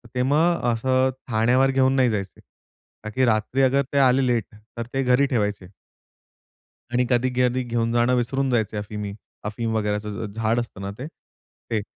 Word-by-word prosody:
ते 125 - +1
मग 160 +6 +2
असं 130 +3 +2 0.2
ठाण्यावर 125 +4 +3
घेऊन 135 0 +3
नाही 130 -2 +3
जायचे. 100 -3 -4 0.6
का 110 - -5
की 130 +4 +1
रात्री 115 +4 +1
ते - - +6
अगर 140 +1 0
आले 130 +1 +3
लेट 120 -4 +1 0.3
तर 115 - -3
ते 135 0 0
घरी 125 +2 +3
ठेवायचे. 105 -7 -1 1.3
आणि 125 0 +2
कधी-कधी 125 0 +1
घेऊन 115 -1 -1
जाणं 120 +1 +3
विसरून 135 +3 0
जायचे 110 -3 0
अफीमी 105 -1 -5 0.3
अफीम 110 +2 -3
वगैरेचं 105 0 -1
झ 110 +2 -5
झाड 115 +1 0
असतं 110 -4 -6
ना 100 0 -4
ते? 135 +4 -6
ते. 115 -8 -8
120 Hz, 165 wpm, -23 LUFS, 110-130 Hz, 1.3 s, ते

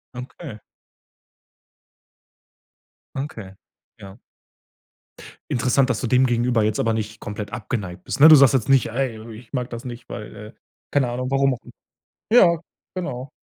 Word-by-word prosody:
Okay. 125 -1 -9 2.6
Okay. 110 -9 -6 0.5
Ja. 100 +2 -11 1.3
Interessant, 125 +2 +2
dass 120 - 0
du 125 - -2
dem 125 +2 +4
gegenüber 120 -2 +1
jetzt 105 0 0
aber 115 - +1
nicht 110 0 -4
komplett 105 0 -6
abgeneigt 100 -6 -5
bist, - - -4
ne? 155 - +11
Du 155 - +10
sagst 140 -2 +6
jetzt 130 -1 0
nicht: 135 -2 +4
„Ey, 120 -1 -3 0.2
ich 115 -1 -16
mag 125 -2 -3
das 120 -1 -7
nicht, 120 -1 -9
weil“, 105 - -8
äh, 105 +2 -11 0.4
keine 135 -4 +1
Ahnung, 125 +1 -3
warum 135 0 +2
auch 120 - -15 0.7
ja, 175 -8 +6 0.4
genau. 135 -7 -5
125 Hz, 145 wpm, -22 LUFS, 110-135 Hz, 2.6 s, ne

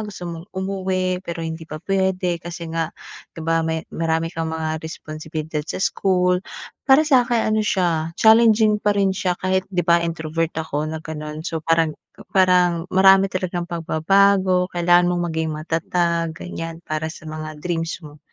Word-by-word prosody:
gusto 210 -4 -7
mong 170 +2 -7
umuwi 185 -1 -2
pero 170 -2 -5
hindi 160 0 -6
pa 155 - -6
pwede 190 -3 0
kasi 170 -1 -7
nga, 165 -1 -1 0.5
'di - - -8
ba 165 0 +2
may 160 0 -2
marami 165 0 -1
kang 165 0 -2
mga 160 -1 -3
responsibilidad 155 -1 -5
sa 155 - -5
school. 180 -1 +1 0.5
Para 270 +4 +7
sa'kin 245 -6 +3
ano 215 - +2
siya, 170 -5 0
challenging 220 -1 +5
pa 205 -1 +1
rin 195 -1 +2
siya 185 -2 -1
kahit 185 0 -1
'di 180 -3 -1
ba, 170 0 +4
introvert 165 -1 -2
ako 155 -1 -2
na 160 0 -6
gano'n, 155 0 -6
so 165 -2 -3
parang 165 0 +2 0.4
parang 180 -2 +3
marami 190 +1 +6
talagang 180 -2 -3
pagbabago. 185 +3 +2
Kailangan 175 0 +4
mong 175 - -1
maging 160 0 0
matatag 165 +1 -1
ganyan, 165 -1 -7
para 155 0 -3
sa 155 - -11
mga 155 -1 -7
dreams 165 0 -3
mo. 150 -2 -13
170 Hz, 160 wpm, -21 LUFS, 160-190 Hz, 0.5 s, Para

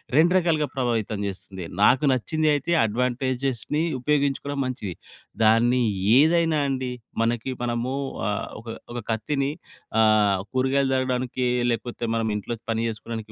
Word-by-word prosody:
2 165 +4 +5
రకాలుగా 160 -4 +1
ప్రభావితం 115 -5 -1
చేస్తుంది. 95 -1 -7 0.2
నాకు 130 +7 +5
నచ్చిందయితే 150 +4 +1
అడ్వాంటేజెస్‌ని 130 +4 -1 0.2
ఉపయోగించుకోవడం 145 +1 0
మంచిది. 120 -7 -4 0.5
దాన్ని 120 +3 +4 0.4
ఏదైనా 160 +1 +4
అండి, 130 -2 -2 0.3
మనకి 120 +2 0
మనము 120 +1 -1 0.4
ఆహ్, 105 -1 -2
ఒక, 110 - -15 0.3
ఒక 120 - -3
కత్తిని 135 +5 -1 0.5
ఆహ్, 105 -3 +4
కూరగాయలు 135 +1 +1
తరగడానికి 130 -1 -1 0.2
లేకపోతే 120 +1 -3
మనం 115 -1 0
ఇంట్లో 105 +3 -3 0.2
పని 115 0 0
చేసుకోడానికి 110 0 -6
125 Hz, 115 wpm, -24 LUFS, 115-140 Hz, 0.5 s, 2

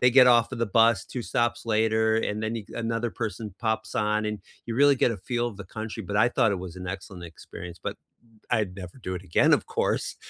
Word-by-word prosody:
they 125 0 +5
get 130 0 +8
off 120 -1 +4
of - - -4
the 115 - +1
bus 115 -3 +5
2 125 - -5
stops 120 -1 0
later, 110 0 +2
and 105 -1 -1
then 110 +1 -1
a 105 - -6
another 115 0 -1
person 110 -2 -4
pops 110 -2 -2
on, 105 0 +1
and 105 -1 -2 0.3
you 115 - -3
really 140 +1 +6
get 125 - +3
a 115 - -3
feel 120 +5 -2
of 105 - -10
the 100 - -8
country, 110 +3 -6
but 100 +2 -3
I 115 +3 +5
thought 115 -4 +2
it 95 - -2
was 90 -1 -8
an 90 0 -7
excellent 95 -1 -6
experience, 85 +1 -10
but - - -4 0.5
I'd 105 -6 +1
never 90 +5 -9
do 95 -6 -4
it 90 - -5
again, 85 - +3
of - - +3
course, - - -1
110 Hz, 240 wpm, -26 LUFS, 100-115 Hz, 0.5 s, get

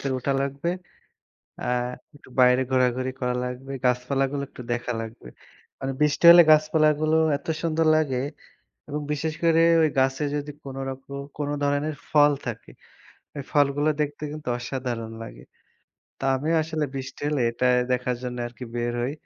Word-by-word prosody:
থেকে 135 -1 -2
উঠা 140 +3 0
লাগবে। 140 +4 -2 0.9
অ্যা - - -2 0.4
একটু 145 - -17
বাইরে 125 +1 +5
ঘোরাঘুরি 130 0 +1
করা 125 -1 0
লাগবে। 125 +2 -6
গাছপালাগুলো 135 +3 0
একটু 125 - -10
দেখা 120 +1 -2
লাগবে। 115 - -8 0.5
মানে 135 0 -2
বৃষ্টি 150 +2 +1
হলে 175 0 +10
গাছপালাগুলো 155 0 +3 0.2
এত - - -22 0.2
সুন্দর 165 -1 +1
লাগে 135 -5 0 0.7
এবং 150 - -3
বিশেষ 155 +1 -2
করে 165 0 +5 0.2
ওই 155 - +4
গাছে 135 +2 +2
যদি 145 0 -4
কোনো 135 -1 -6
রকম 135 +1 -9 0.2
কোনো 145 -1 -2
ধরনের 145 +2 0 0.2
ফল 145 -1 +5
থাকে, 115 -2 -6 0.7
ওই 140 - -4
ফলগুলো 145 +1 +2
দেখতে 145 0 -2
কিন্তু 150 -4 -7
অসাধারণ 120 -2 -4
লাগে। - - -10 0.8
তা - - -6
আমিও 155 +5 0
আসলে 155 -1 -2
বৃষ্টি 135 0 -6
হলে 150 -2 0
এটা 120 +2 -1 0.3
দেখার 125 0 0
জন্যে 125 -1 -4
আরকি 120 +1 -10
বের 120 0 -1
হই। 130 +3 -1
135 Hz, 155 wpm, -25 LUFS, 125-150 Hz, 0.9 s, হলে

